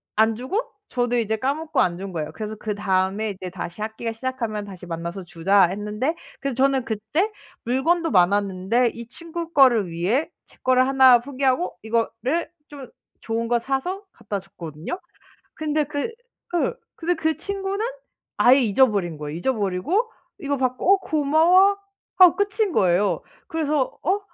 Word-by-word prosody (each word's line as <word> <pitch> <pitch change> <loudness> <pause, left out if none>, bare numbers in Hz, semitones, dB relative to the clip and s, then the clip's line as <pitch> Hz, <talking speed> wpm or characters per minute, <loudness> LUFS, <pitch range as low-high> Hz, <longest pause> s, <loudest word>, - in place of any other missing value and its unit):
안 220 +1 +3
주고 260 - -2 0.3
저도 245 0 0
이제 220 -1 0
까먹고 285 +6 -1
안 175 -1 +2
준 195 +1 -6
거예요. 155 -3 -4
그래서 215 +2 -5
그다음에 205 0 -1
이제 185 -1 -7
"다시 180 +1 -7
학기가 220 +1 -4
시작하면 225 -3 -3
다시 190 -3 -10
만나서 170 +2 -5
주자." 185 +3 +3
했는데 210 - -2 0.3
그래서 275 -3 -2
저는 265 0 +2
그때 235 - -1 0.3
물건도 330 +8 +1
많았는데 200 +4 +2
이 235 -1 -9
친구 335 +4 -7
거를 245 - +5
위해 185 - 0 0.2
제 - - -21
거를 255 0 +4
1 260 -2 +7
포기하고 270 +5 -1
이거를 230 +7 -1 0.2
좀 280 -3 -10 0.3
좋은 230 +1 -2
거 240 0 +2
사서 275 - -2
갖다 210 -3 -5
줬거든요. 180 - -7 0.5
근데 305 -1 0
그 290 +7 -3 0.4
그 350 +5 0 0.2
근데 350 +2 -1
그 320 -1 0
친구는 395 +1 -3 0.5
아예 255 +3 +6
잊어버린 205 -8 +2
거예요. 150 0 -6
잊어버리고 230 - 0 0.3
이거 285 -1 -2
받고 255 +8 +2
"어 - - +4
고마워." 335 +5 +4 0.4
하고 365 -3 +8
끝인 405 0 0
거예요. 190 - +2 0.3
그래서 300 -4 -1
'어? 380 +5 +2
245 Hz, 320 characters per minute, -23 LUFS, 200-305 Hz, 0.5 s, 하고